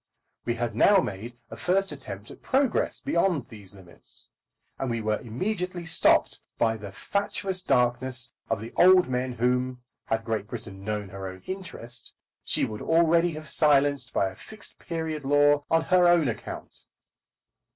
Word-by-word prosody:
We 120 - 0
had 120 -1 -2
now 205 - +6
made 115 - -3
a - - -6
first 190 - +1
attempt 100 -8 -8
at - - -13
progress 265 -2 +1
beyond 170 -6 0
these 100 -3 -11
limits, 90 -3 -10 0.5
and 135 - -2
we 115 -1 -1
were 110 -1 0
immediately 180 - -3
stopped 165 - +3 0.2
by 115 -1 +2
the 105 -2 -8
fatuous 195 - -1
darkness 125 -2 +1 0.2
of 115 - 0
the 115 - -8
old 185 0 +7
men 125 0 -1
whom, 125 +1 0 0.2
had 115 0 -1
Great 110 -3 -2
Britain 105 -4 -8
known 105 -1 -3
her 95 0 -6
own 95 0 -9
interest, 125 - -5 0.3
she - - +1
would 105 -1 -6
already 170 +1 +3
have 155 0 -7
silenced 140 -3 +3
by 95 - +1
a 95 - -12
Fixed 215 - -8
Period 160 -3 -4
law 145 +1 +4
on 165 0 +3
her 180 +1 +4
own 175 -4 +5
account. 115 - -6
130 Hz, 160 wpm, -27 LUFS, 110-170 Hz, 0.5 s, old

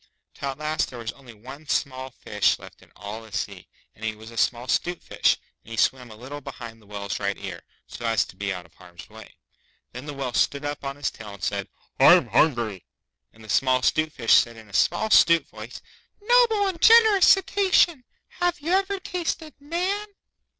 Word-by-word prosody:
Till 140 - -5
at 135 - -5
last 155 +1 -1
there 125 - -9
was 115 -1 -5
only 125 -4 -15
one 135 +8 -12
small 130 -1 -2
fish 105 -4 0
left - - -14
in - - -21
all 105 +3 -7
the 110 -2 -15
sea, 100 -1 -5 0.3
and 110 - -16
he 110 -1 -2
was 110 +1 -12
a - - -12
small 120 +2 0
'Stute 175 +5 -1
Fish, - - +1 0.3
and - - -16
he 115 - -7
swam 125 +1 +1
a 110 - -11
little 135 +6 -9
behind 115 -4 -9
the 105 - -21
Whale's 100 -1 -5
right 100 0 -2
ear, 95 -4 -7 0.2
so 120 - -6
as 115 -2 +2
to - - -15
be 100 +1 -3
out 90 -2 -6
of 80 - -22
harm's 90 +1 -14
way. 110 0 -13 0.6
Then 125 +4 -9
the 145 - -6
Whale 135 -3 -4
stood 140 +4 +1
up 145 0 -4
on 135 0 -4
his 145 -1 -2
tail 105 -2 -10
and 95 - -15
said, 100 -1 -2 0.3
'I'm - - +7
hungry.' 120 - +1 0.4
And 110 - -18
the - - -13
small 130 +5 +2
'Stute 155 +3 +2
Fish 120 -7 +2
said 115 -1 +4
in 110 -1 -13
a - - -21
small 220 - +2
'stute 170 -4 +5
voice, - - -10 0.4
'Noble 450 -1 +4
and 370 -4 -3
generous 440 -4 +7
Cetacean, 380 -6 +3 0.4
have 355 -1 +1
you 315 +4 -3
ever 390 +1 +1
tasted 335 -4 -4
Man? 365 +8 -2
130 Hz, 205 wpm, -24 LUFS, -, 0.6 s, I'm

